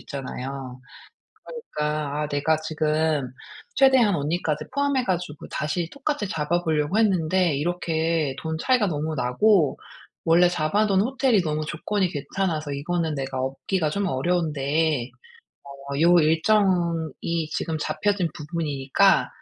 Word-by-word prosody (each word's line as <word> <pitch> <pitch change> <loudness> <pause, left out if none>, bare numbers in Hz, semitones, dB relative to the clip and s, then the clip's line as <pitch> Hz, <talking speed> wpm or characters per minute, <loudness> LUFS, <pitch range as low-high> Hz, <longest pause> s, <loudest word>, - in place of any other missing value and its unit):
있잖아요. 130 -1 -6 0.6
그러니까 150 - -3
"아 - - -1
내가 145 +2 +1
지금 155 -3 0 0.5
최대한 260 -6 +5
언니까지 150 +1 -1
포함해 280 -2 +1
가지고 175 -6 -3
다시 160 +3 -2
똑같이 280 -6 -2
잡아 165 +1 -1
보려고 155 +5 0
했는데 185 -5 +2
이렇게 160 -2 -1
돈 160 0 -3
차이가 250 -5 +2
너무 155 -1 -2
나고 145 - +2 0.5
원래 175 +2 +5
잡아 180 +5 +1
둔 195 -1 +3
호텔이 255 -4 +2
너무 155 -1 -2
조건이 190 +5 -1
괜찮아서 155 0 -3
이거는 160 +3 -2
내가 135 -1 -4
엎기가 150 +5 -1
좀 200 +5 -1
어려운데 155 -3 0 0.8
어 140 - -2
요 175 +1 +6
일정이 165 -2 +1
지금 160 -2 -2
잡혀진 195 +3 0
부분이니까 150 +3 +1
160 Hz, 295 characters per minute, -24 LUFS, 150-185 Hz, 0.8 s, 요